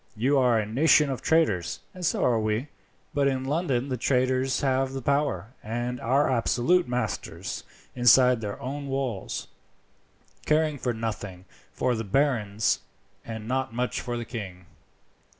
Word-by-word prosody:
You 135 +6 +2
are 125 -3 +4
a 110 - 0
nation 145 +5 +4
of 130 - -4
traders, 130 - +1
and 185 - -9
so - - +1
are 115 -2 +3
we; 110 +6 -1 0.4
but 140 -1 +2
in 130 -1 0
London 140 -3 0
the 130 - -1
traders 130 +1 +1
have 135 -1 +1
the 135 - -4
power, 130 -7 0
and 120 +3 -3
are 135 +5 +2
absolute 130 +8 +2
masters 125 0 -3 0.3
inside 125 0 +5
their 105 -2 -5
own 140 +2 -5
walls, 135 -7 -3 1.0
caring 155 -2 +2 0.2
nothing 105 -5 -5 0.3
for 125 - 0
the 115 -1 -2
barons, 110 -3 +1 0.4
and 110 -1 -7
not 130 -1 -1
much 125 +1 -1
for 120 -1 -3
the 120 - -4
king. 95 -6 -7
125 Hz, 145 wpm, -26 LUFS, 110-140 Hz, 1.0 s, inside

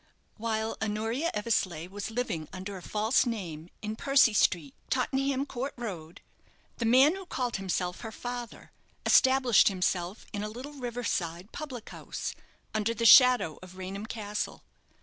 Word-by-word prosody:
While 220 0 -2
Honoria 225 +8 -1
Eversleigh 195 -7 0
was 200 +3 -5
living 220 -10 -3
under 190 +2 -6
a 185 - -8
false 220 +7 +1
name 175 -8 -5
in 215 +1 -3
Percy 275 -2 +4
Street, 170 -8 +2 0.2
Tottenham 270 +1 0
Court 270 0 -4
Road, 180 -9 -7 0.6
the 235 - 0
man 265 +8 +6
who 385 -2 -9
called 250 -7 -2
himself 180 -2 -2
her 225 - -6
father, 245 +1 -7 0.3
established 260 -4 +5
himself 185 0 -1
in 205 - -3
a 210 - -3
little 255 +7 -8
river 245 -3 -5
side 175 -1 -2
public 260 -7 -7
house, - - -5 0.4
under 215 +2 0
the 230 - -1
shadow 250 - +7
of 185 0 -12
Raynham 195 +3 -6
Castle. 210 -2 -4
220 Hz, 150 wpm, -29 LUFS, 190-245 Hz, 0.6 s, shadow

